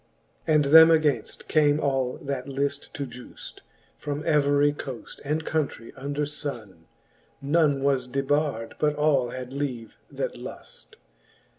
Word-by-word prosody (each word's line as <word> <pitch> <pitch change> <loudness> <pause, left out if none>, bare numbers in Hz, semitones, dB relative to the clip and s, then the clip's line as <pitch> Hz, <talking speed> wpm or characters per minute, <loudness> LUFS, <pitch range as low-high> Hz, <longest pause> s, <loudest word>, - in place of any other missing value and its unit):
And 150 -2 +4
them 160 +3 +9
againft 150 -8 +1
came 150 -1 +3
all 135 -3 0
that 140 -1 -4
lift 140 +1 -3
to 140 - -3
giuft, 125 -1 -11 0.4
From 145 +1 -4
every 145 -1 +3
coaft 135 -4 -8
and 155 +3 -2
countrie 145 -7 -2
under 140 +2 -3
funne: 115 - -6 0.6
l^[one 145 -2 +3
was 135 -2 +1
debard, 135 -3 -1
but 150 -1 +2
all 145 -4 +2
had 130 0 -7
leave 130 -5 -4
that - - -4
luft. - - -10
140 Hz, 130 wpm, -26 LUFS, 130-150 Hz, 0.6 s, them